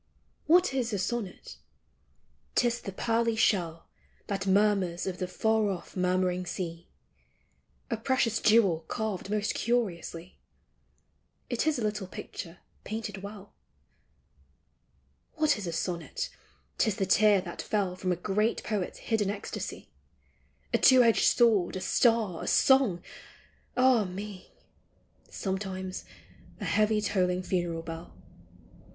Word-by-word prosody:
What 350 Hz, -1 st, +5 dB
is 250 Hz, -3 st, -1 dB
a -, -, +1 dB
sonnet? 200 Hz, 0 st, -4 dB, 1.0 s
'T -, -, +3 dB
is 240 Hz, 0 st, -2 dB
the 195 Hz, -, -6 dB
pearly 230 Hz, +3 st, 0 dB
shell 170 Hz, -7 st, +1 dB, 0.4 s
That 195 Hz, -1 st, -3 dB
murmurs 195 Hz, -3 st, +2 dB
of 185 Hz, -1 st, -4 dB
the 185 Hz, -, -2 dB
far 220 Hz, +2 st, +1 dB
off 185 Hz, -3 st, -6 dB
murmuring 180 Hz, 0 st, 0 dB
sea; 170 Hz, -1 st, -5 dB, 1.0 s
A 230 Hz, -, 0 dB
precious 230 Hz, -1 st, +1 dB
jewel 210 Hz, -7 st, +4 dB
carved 215 Hz, -3 st, -3 dB
most 210 Hz, 0 st, 0 dB
curiously; 185 Hz, -7 st, -2 dB, 1.1 s
It -, -, 0 dB
is 315 Hz, -, +2 dB
a 240 Hz, -, -2 dB
little 210 Hz, -2 st, -2 dB
picture 175 Hz, -1 st, -8 dB, 0.2 s
painted 215 Hz, -2 st, -5 dB
well. 200 Hz, 0 st, -10 dB, 1.8 s
What 310 Hz, -2 st, +3 dB
is 205 Hz, -4 st, -5 dB
a -, -, -2 dB
sonnet? 180 Hz, -, -3 dB, 0.5 s
'T -, -, +3 dB
is 215 Hz, -, +1 dB
the 200 Hz, -3 st, 0 dB
tear 205 Hz, +1 st, +5 dB
that 175 Hz, -2 st, -6 dB
fell 195 Hz, -4 st, -1 dB
From 185 Hz, 0 st, -2 dB
a -, -, +2 dB
great 210 Hz, +5 st, 0 dB
poet's 205 Hz, -4 st, -3 dB
hidden 215 Hz, -3 st, 0 dB
ecstasy; 205 Hz, 0 st, -6 dB, 0.8 s
A -, -, +3 dB
two 255 Hz, -1 st, +7 dB
edged 230 Hz, -1 st, +4 dB
sword, 220 Hz, -8 st, +4 dB
a -, -, -2 dB
star, 225 Hz, -8 st, +2 dB
a -, -, -5 dB
song, 265 Hz, -10 st, +4 dB, 0.4 s
— -, -, -29 dB
ah 250 Hz, -4 st, +5 dB
me! 190 Hz, +1 st, -8 dB, 0.8 s
Sometimes 190 Hz, -1 st, -4 dB, 0.5 s
a -, -, -4 dB
heavy 215 Hz, 0 st, +2 dB
tolling 185 Hz, -3 st, 0 dB
funeral 175 Hz, -3 st, -2 dB
bell. 165 Hz, +1 st, -8 dB
200 Hz, 130 wpm, -29 LUFS, 185-225 Hz, 1.8 s, two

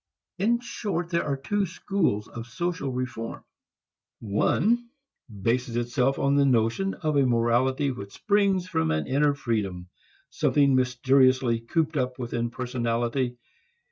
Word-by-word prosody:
In 235 Hz, +5 st, +2 dB
short, 185 Hz, -8 st, -4 dB
there 170 Hz, -, +1 dB
are 140 Hz, -2 st, -1 dB
two 195 Hz, +9 st, -1 dB
schools 170 Hz, -, -1 dB
of 115 Hz, 0 st, -8 dB
social 165 Hz, +1 st, -3 dB
reform. 120 Hz, -3 st, -5 dB, 0.8 s
One 220 Hz, -, +1 dB, 0.5 s
bases 120 Hz, +1 st, 0 dB
itself 125 Hz, +3 st, 0 dB
upon 140 Hz, +1 st, +2 dB
the 140 Hz, -, +5 dB
notion 125 Hz, -, +1 dB
of 155 Hz, -2 st, -2 dB
a 140 Hz, -, +4 dB
morality 125 Hz, +4 st, +2 dB
which 100 Hz, -5 st, -8 dB
springs 200 Hz, -3 st, +1 dB
from 80 Hz, -, 0 dB
an 80 Hz, 0 st, 0 dB
inner 145 Hz, +2 st, +2 dB
freedom, 100 Hz, -9 st, -3 dB, 0.4 s
something 140 Hz, -2 st, +3 dB
mysteriously 130 Hz, -1 st, +3 dB
cooped 150 Hz, +6 st, -1 dB
up 125 Hz, -1 st, -1 dB
within 120 Hz, -1 st, -2 dB
personality. 120 Hz, 0 st, -2 dB
130 Hz, 130 wpm, -26 LUFS, 120-155 Hz, 0.8 s, the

